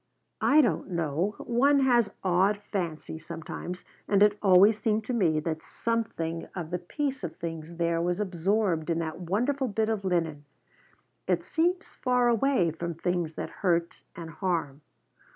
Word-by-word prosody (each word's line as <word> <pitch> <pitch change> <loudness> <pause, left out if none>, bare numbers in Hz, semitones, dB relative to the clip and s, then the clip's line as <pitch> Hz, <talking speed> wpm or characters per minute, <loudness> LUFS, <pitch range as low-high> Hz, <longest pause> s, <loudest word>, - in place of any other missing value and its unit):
I 305 +2 +6
don't 200 - 0
know, 170 +3 -1
one 275 +4 +3
has 240 -5 +4
odd 190 +3 +3
fancies 170 -6 -5
sometimes, 170 +2 -7 0.2
and 200 0 +4
it 210 0 +4
always 200 +2 +6
seemed 220 -1 +1
to 250 - -3
me 170 -9 +2
that 160 0 -3
something 170 -9 -3
of 170 -3 -5
the 180 - -1
peace 270 - -3
of 170 - -4
things 165 0 -6
there 170 0 0
was 175 +2 0
absorbed 185 -3 0
in 165 - +1
that 160 0 -3
wonderful 245 +10 0
bit 220 0 0
of 215 -3 -1
linen. 165 -6 -1 0.8
It 175 -2 +1
seems 350 - 0
far 250 -1 +2
away 235 -7 +2
from 170 +1 -5
things 175 -1 -1
that - - -5
hurt 170 -3 0
and 165 -1 -7
harm. 160 -4 -2
180 Hz, 155 wpm, -28 LUFS, 165-220 Hz, 0.8 s, I